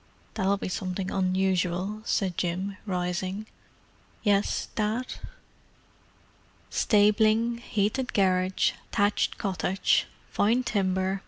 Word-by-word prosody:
"That'll 195 +1 +1
be - - -4
something 185 0 -3
unusual," 185 +1 0
said 190 -6 0
Jim, 185 +4 -2
rising. 185 +2 -2 0.8
"Yes, 205 -1 +1
Dad?" 220 +4 -1 1.6
"Stabling, 215 +2 +3
heated 220 +3 -1
garage, 185 -1 +2 0.2
thatched 205 +1 +1
cottage. 190 -1 +1 0.2
Fine 230 +5 +2
timber. 190 -3 0
195 Hz, 85 wpm, -27 LUFS, 185-210 Hz, 1.6 s, Stabling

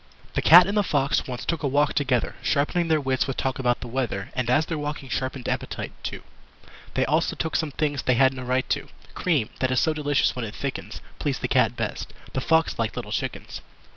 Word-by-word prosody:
The - - 0
Cat 175 +3 +9
and 200 +3 -2
the 210 - +4
Fox 145 -7 +1
once 125 -2 -5
took 170 - -1
a 145 - 0
walk 145 +2 +2
together, 130 -4 +1
Sharpening 160 +4 +1
their 160 -1 +3
wits 130 -2 0
with 135 - -3
talk 130 0 -1
about 120 -2 +1
the - - -6
weather 115 -5 -3
And 130 -2 -1
as 145 +6 +3
their 160 -2 -3
walking 145 -2 -5
sharpened 130 0 -3
appetite, - - -3
too; - - -5 0.7
They - - +2
also - - +1
took 160 -1 -3
some 160 -2 +1
things 145 -1 -1
they 125 - +2
had 130 +2 +4
no 130 - -7
right 125 +1 0
to. - - -1 0.3
Cream, 150 -12 0
that 130 - +1
is 130 -1 +2
so 160 - +2
delicious 145 -2 +1
when 125 - -3
it 110 -1 -6
thickens, 140 -1 -5 0.2
Pleased - - -2
the - - 0
Cat - - +3
best. - - -4 0.2
The 130 - -1
Fox 160 0 +2
liked 110 -2 -1
little - - -5
chickens. - - -4
135 Hz, 225 wpm, -25 LUFS, 130-155 Hz, 0.7 s, Cat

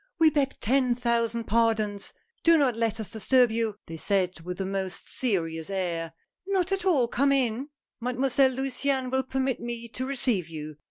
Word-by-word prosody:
"We 320 -1 +5
beg 275 -2 0
ten 250 +1 +2
thousand 235 -1 0
pardons! 220 -2 +1 0.3
Do 335 0 +6
not 270 -6 +2
let 225 -1 -1
us 220 - -5
disturb 245 +2 +3
you," 225 -2 -1
they 165 - -7
said 185 -1 0
with 180 +3 -6
a 190 - -1
most 190 -1 -3
serious 165 -9 -1
air. 170 -4 -2 0.3
"Not 385 -2 +1
at 390 -1 0
all, 290 -10 +3
come 275 +4 +2
in! 260 0 +1 0.3
Mademoiselle 255 +2 +2
Luciane 265 0 -1
will 265 0 +2
permit 265 0 -1
me 235 0 -5
to 255 +3 -4
receive 240 - 0
you. 155 -2 -7
235 Hz, 170 wpm, -27 LUFS, 200-265 Hz, 0.3 s, Do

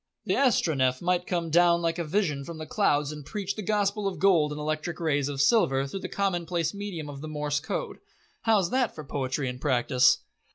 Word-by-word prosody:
"The - - +1
Astronef 140 - +2
might 180 0 0
come 170 -3 -2
down 170 +1 +4
like 165 +1 0
a - - 0
vision 155 -4 -1
from 165 +3 -8
the 155 - -6
clouds 150 -7 +1
and 150 -1 -8
preach 200 +4 -4
the 215 - -4
Gospel 205 0 0
of 195 - -3
Gold 170 -6 +3
in 150 - -5
electric 155 +2 -3
rays 145 -4 0
of 140 -1 -5
silver 140 - +3
through 140 +8 -5
the - - -6
commonplace 175 -4 -1
medium 200 -7 -5
of 140 -1 -8
the 155 - -6
Morse 150 -1 -2
Code. 160 - -4 0.4
How's 210 -6 +2
that 255 -3 +1
for 155 - -7
poetry 135 0 -2
and 125 0 -5
practice?" 125 -2 +3
160 Hz, 205 wpm, -27 LUFS, 145-195 Hz, 0.4 s, down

